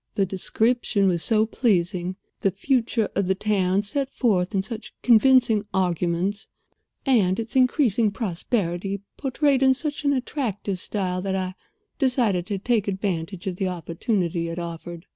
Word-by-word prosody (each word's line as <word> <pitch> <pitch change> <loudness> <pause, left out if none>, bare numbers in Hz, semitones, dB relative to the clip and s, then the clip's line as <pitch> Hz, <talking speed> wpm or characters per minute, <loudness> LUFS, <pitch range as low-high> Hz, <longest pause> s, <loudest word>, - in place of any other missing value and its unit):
The 195 - +2
description 205 +2 +1
was 175 -3 +1
so 220 +1 +3
pleasing, 185 -5 0 0.2
the 195 - +2
future 230 +2 0
of 200 -2 0
the 190 - +2
town 195 -1 +1
set 270 +6 -2
forth 200 -7 0
in 190 - +1
such 225 +2 -8
convincing 235 -3 +5
arguments, 180 +2 0 0.6
and 210 -8 +3
its 225 +3 -5
increasing 250 -4 +3
prosperity 195 -2 -2
portrayed 275 0 +1
in 265 -1 +5
such 295 +2 -3
an 285 -1 +3
attractive 235 -8 -2
style 185 -2 -2
that 190 0 -2
I 185 -1 -2 0.5
decided 235 - +1
to 200 - -2
take 215 +1 0
advantage 190 -1 -3
of 185 -2 -3
the 190 - 0
opportunity 170 0 -2
it 165 +1 -5
offered. 170 0 -6
200 Hz, 145 wpm, -24 LUFS, 180-235 Hz, 0.6 s, convincing